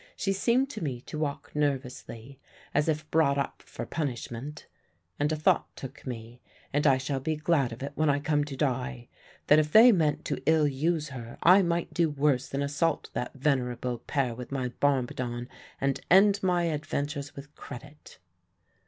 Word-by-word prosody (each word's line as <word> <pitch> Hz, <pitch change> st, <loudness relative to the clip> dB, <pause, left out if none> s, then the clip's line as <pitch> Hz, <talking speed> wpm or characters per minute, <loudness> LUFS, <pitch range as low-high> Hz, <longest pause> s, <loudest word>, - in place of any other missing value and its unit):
She 195 Hz, -, 0 dB
seemed 240 Hz, +7 st, +2 dB
to -, -, -6 dB
me 130 Hz, -5 st, -3 dB
to 150 Hz, -, -7 dB
walk 145 Hz, -2 st, -3 dB
nervously, 135 Hz, -3 st, -3 dB, 0.3 s
as 150 Hz, +2 st, +2 dB
if 155 Hz, -1 st, -1 dB
brought 150 Hz, -3 st, +3 dB
up 140 Hz, -, -3 dB
for -, -, -7 dB
punishment; 140 Hz, -1 st, -5 dB, 0.5 s
and 150 Hz, +1 st, +1 dB
a -, -, +1 dB
thought 155 Hz, -, +1 dB
took 135 Hz, 0 st, -9 dB
me 120 Hz, 0 st, -7 dB, 0.3 s
and 145 Hz, +1 st, +2 dB
I 135 Hz, -2 st, +5 dB
shall 135 Hz, +1 st, -2 dB
be 155 Hz, +4 st, -1 dB
glad 150 Hz, -5 st, +1 dB
of 115 Hz, +3 st, -7 dB
it 140 Hz, -, -4 dB
when 155 Hz, +1 st, +1 dB
I 140 Hz, -, +3 dB
come 145 Hz, 0 st, +1 dB
to 145 Hz, -2 st, -6 dB
die 125 Hz, -3 st, -2 dB, 0.4 s
that 150 Hz, -, +6 dB
if 150 Hz, 0 st, 0 dB
they 230 Hz, +6 st, +9 dB
meant 160 Hz, -7 st, +1 dB
to -, -, -2 dB
ill 160 Hz, -2 st, +4 dB
use 150 Hz, +2 st, 0 dB
her 120 Hz, -4 st, -8 dB
I 185 Hz, +4 st, +8 dB
might 170 Hz, -2 st, -1 dB
do 170 Hz, -2 st, +2 dB
worse 145 Hz, -3 st, +1 dB
than 140 Hz, +1 st, -2 dB
assault 145 Hz, +4 st, -1 dB
that 125 Hz, -, -4 dB
venerable 125 Hz, -3 st, -1 dB
pair 135 Hz, -4 st, -1 dB
with 125 Hz, +2 st, -8 dB
my 130 Hz, -2 st, -1 dB
bombardon 125 Hz, -2 st, -1 dB, 0.3 s
and 135 Hz, 0 st, 0 dB
end 200 Hz, +2 st, +6 dB
my 180 Hz, -2 st, +2 dB
adventures 145 Hz, -3 st, -3 dB
with 145 Hz, +1 st, -10 dB
credit. 145 Hz, +4 st, -11 dB
145 Hz, 180 wpm, -28 LUFS, 130-155 Hz, 0.5 s, they